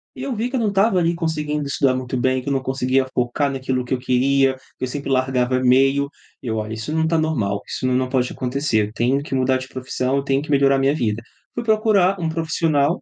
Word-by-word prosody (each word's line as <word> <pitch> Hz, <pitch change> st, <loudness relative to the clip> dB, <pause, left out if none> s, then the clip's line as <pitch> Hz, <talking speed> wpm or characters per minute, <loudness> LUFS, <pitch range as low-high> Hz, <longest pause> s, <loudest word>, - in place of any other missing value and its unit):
E -, -, -7 dB
eu 275 Hz, -, -2 dB
vi 230 Hz, +3 st, -1 dB
que 265 Hz, -, -4 dB
eu -, -, +1 dB
não 220 Hz, -2 st, +1 dB
estava 200 Hz, 0 st, +3 dB
ali 170 Hz, 0 st, +1 dB
conseguindo 150 Hz, -3 st, -2 dB
estudar 135 Hz, -1 st, +1 dB
muito 130 Hz, 0 st, -3 dB
bem, 130 Hz, +1 st, +1 dB
que 135 Hz, -, -5 dB
eu -, -, +1 dB
não 135 Hz, -, 0 dB
conseguia 130 Hz, 0 st, 0 dB
focar 125 Hz, +4 st, 0 dB
naquilo 130 Hz, -1 st, -2 dB
que 125 Hz, -, -2 dB
eu 130 Hz, -, 0 dB
queria, 130 Hz, +1 st, +2 dB, 0.2 s
que -, -, -7 dB
eu -, -, 0 dB
sempre 140 Hz, +2 st, -5 dB
largava 130 Hz, -1 st, +1 dB
meio, 135 Hz, +2 st, +3 dB, 0.3 s
eu: 115 Hz, -3 st, -2 dB
"Olha, 110 Hz, 0 st, -3 dB
isso 110 Hz, +6 st, -5 dB
não 160 Hz, 0 st, +1 dB
está 160 Hz, +1 st, +1 dB
normal, 110 Hz, -11 st, 0 dB
isso -, -, -4 dB
não 130 Hz, -, +1 dB
não 130 Hz, 0 st, 0 dB
pode 125 Hz, -1 st, 0 dB
acontecer, 125 Hz, -4 st, 0 dB
eu 105 Hz, -, -13 dB
tenho 130 Hz, +5 st, +1 dB
que 145 Hz, -, -7 dB
mudar 130 Hz, 0 st, +2 dB
de 130 Hz, 0 st, -7 dB
profissão, 130 Hz, +1 st, -2 dB
eu 140 Hz, -, -1 dB
tenho 135 Hz, 0 st, +1 dB
que 150 Hz, -, -10 dB
melhorar 140 Hz, -1 st, +4 dB
a -, -, +1 dB
minha 135 Hz, +2 st, +2 dB
vida". 115 Hz, -6 st, -1 dB, 0.3 s
Fui 240 Hz, -, -3 dB
procurar 215 Hz, -4 st, +3 dB
um 165 Hz, -, -1 dB
profissional, 160 Hz, -1 st, 0 dB
135 Hz, 250 wpm, -21 LUFS, 130-155 Hz, 0.3 s, melhorar